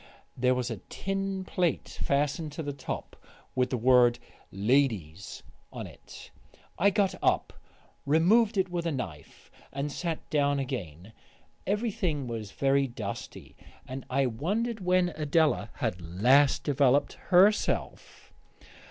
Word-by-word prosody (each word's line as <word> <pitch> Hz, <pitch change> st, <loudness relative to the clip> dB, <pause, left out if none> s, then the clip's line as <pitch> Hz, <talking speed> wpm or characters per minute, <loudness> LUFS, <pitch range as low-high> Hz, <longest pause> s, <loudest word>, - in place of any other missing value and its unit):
There 125 Hz, 0 st, +2 dB
was 125 Hz, -1 st, -2 dB
a 115 Hz, -, -4 dB
tin 195 Hz, 0 st, -3 dB
plate 180 Hz, -3 st, 0 dB
fastened 145 Hz, +2 st, 0 dB
to 160 Hz, -, -5 dB
the 145 Hz, -1 st, -4 dB
top, 140 Hz, -, -6 dB, 0.4 s
with 125 Hz, 0 st, +1 dB
the 125 Hz, -, -1 dB
word 120 Hz, 0 st, +5 dB, 0.3 s
"LADIES" 100 Hz, -, 0 dB, 0.3 s
on -, -, -6 dB
it. -, -, -13 dB, 0.5 s
I 200 Hz, +4 st, +5 dB
got 200 Hz, -1 st, +1 dB
up, -, -, +1 dB, 0.5 s
removed 205 Hz, +9 st, +4 dB
it 190 Hz, 0 st, +2 dB
with 170 Hz, -1 st, -2 dB
a -, -, 0 dB
knife, 90 Hz, -, -7 dB, 0.2 s
and 140 Hz, +1 st, -3 dB
sat 165 Hz, +1 st, -4 dB
down 145 Hz, -1 st, +2 dB
again. 105 Hz, -, -5 dB, 0.5 s
Everything 195 Hz, -, -1 dB
was 115 Hz, -4 st, -5 dB
very 135 Hz, 0 st, +2 dB
dusty, 110 Hz, -5 st, -7 dB, 0.3 s
and 130 Hz, 0 st, -6 dB
I 135 Hz, +1 st, +2 dB
wondered 205 Hz, -, -2 dB
when 180 Hz, -1 st, +2 dB
Adela 155 Hz, 0 st, +1 dB
had 110 Hz, -9 st, -2 dB
last 125 Hz, -, +3 dB
developed 140 Hz, -1 st, +2 dB, 0.2 s
herself. 195 Hz, +4 st, +2 dB
140 Hz, 125 wpm, -28 LUFS, 125-175 Hz, 0.5 s, word